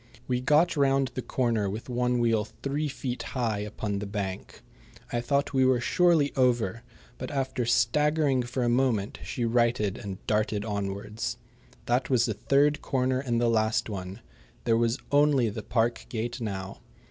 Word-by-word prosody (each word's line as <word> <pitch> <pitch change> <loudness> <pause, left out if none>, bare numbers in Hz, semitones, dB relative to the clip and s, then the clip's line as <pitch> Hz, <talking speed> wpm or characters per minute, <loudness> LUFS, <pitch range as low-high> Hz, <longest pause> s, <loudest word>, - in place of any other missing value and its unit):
We 125 -1 0
got 150 +7 +3
round 135 -2 +2
the 130 - -3
corner 115 -6 0
with 105 +4 -6
one 125 0 0
wheel 115 -2 +2 0.2
three 145 +2 -1
feet 130 -3 -4 0.2
high 115 -4 0
upon 105 -1 -3
the 105 - -5
bank. 100 -2 -5 0.5
I 120 - +1
thought 140 +3 0
we 130 -1 +3
were 130 -1 +4
surely 165 +1 +3
over, 120 -5 +1 0.4
but 130 - -5
after 130 -3 -2
staggering 150 0 +2
for 125 +1 -3
a - - +1
moment 120 -4 +1
she 120 - -2
righted 115 -4 +1
and 100 -2 -6
darted 105 -1 0
onwards. 100 0 -3 0.5
That 125 +2 +1
was 125 -3 +3
the 110 - -1
third 145 +7 +2
corner 130 -1 0
and 120 -3 -1
the 120 - +2
last 110 0 +1
one. 95 -1 -6 0.4
There 115 -1 +3
was 115 +2 +1
only 145 -5 +4
the 105 - -5
park 115 0 0
gate 120 +1 -4
now. 95 -3 -5
120 Hz, 165 wpm, -27 LUFS, 110-135 Hz, 0.5 s, were